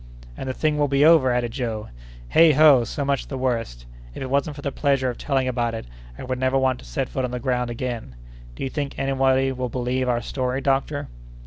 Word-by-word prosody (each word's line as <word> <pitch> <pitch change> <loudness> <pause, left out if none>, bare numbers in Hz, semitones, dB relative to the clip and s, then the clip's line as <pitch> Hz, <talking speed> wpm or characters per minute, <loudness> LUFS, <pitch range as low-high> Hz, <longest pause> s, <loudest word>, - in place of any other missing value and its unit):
"And 130 - -5
the - - -1
thing 150 +2 0
will 145 - +3
be 140 +1 +3
over!" 160 -5 +6
added 120 -1 0
Joe. 115 -4 -4 0.4
"Heigh 165 -2 +7
ho! 145 -4 +6
so 140 +5 -3
much 140 -1 -1
the 135 - -5
worse. 115 - -2 0.3
If - - -5
it 130 - -6
wasn't 140 +2 0
for 145 - -10
the 140 - -2
pleasure 135 -2 +1
of 120 - -11
telling 135 -3 0
about 120 -2 -1
it, 115 - -6 0.3
I - - -8
would 130 0 -3
never 130 +1 +2
want 130 -1 +1
to - - -13
set - - -3
foot 130 - -3
on 125 - -1
the 125 0 -4
ground 125 -1 -1
again! 120 - -5 0.4
Do - - -6
you 135 - -2
think 145 -2 -4
anybody 135 -1 +2
will 130 -1 -3
believe 125 +1 -1
our 120 -1 0
story, 130 -1 -2
doctor?" 140 +1 0
130 Hz, 230 wpm, -23 LUFS, 125-140 Hz, 0.4 s, Heigh